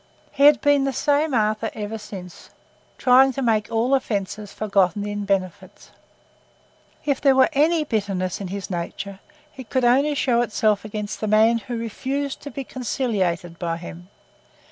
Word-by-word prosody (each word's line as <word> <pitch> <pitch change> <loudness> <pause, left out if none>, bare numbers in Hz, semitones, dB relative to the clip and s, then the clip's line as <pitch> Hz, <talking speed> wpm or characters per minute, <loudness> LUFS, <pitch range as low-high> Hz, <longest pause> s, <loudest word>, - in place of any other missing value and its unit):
He 280 0 +3
had 295 -1 +6
been 285 -1 +3
the 275 - -1
same 290 +4 +1
Arthur 215 0 +1
ever 215 +1 -5
since, 185 -4 -10 0.5
trying 265 +1 +5
to 270 - -3
make 215 -3 +1
all 230 +4 +1
offences 210 -5 -2
forgotten 200 -1 0
in 205 0 -4
benefits. 190 -2 -3 1.1
If 280 -3 0
there 275 -2 +4
were 260 0 +5
any 310 +3 +3
bitterness 200 -8 -2
in 195 - -4
his 195 +1 -6
nature, 190 +3 -5 0.4
it 260 -4 -10
could 260 -2 +1
only 275 +5 +3
show 245 -4 +2
itself 215 -3 +1
against 210 -1 -5
the 215 - -1
man 220 +2 +4
who 240 +1 -6
refused 265 +5 -4
to 285 - -7
be 275 - -6
conciliated 195 -10 -2
by 165 -2 -2
him. 175 +1 -10
220 Hz, 160 wpm, -22 LUFS, 200-265 Hz, 1.1 s, had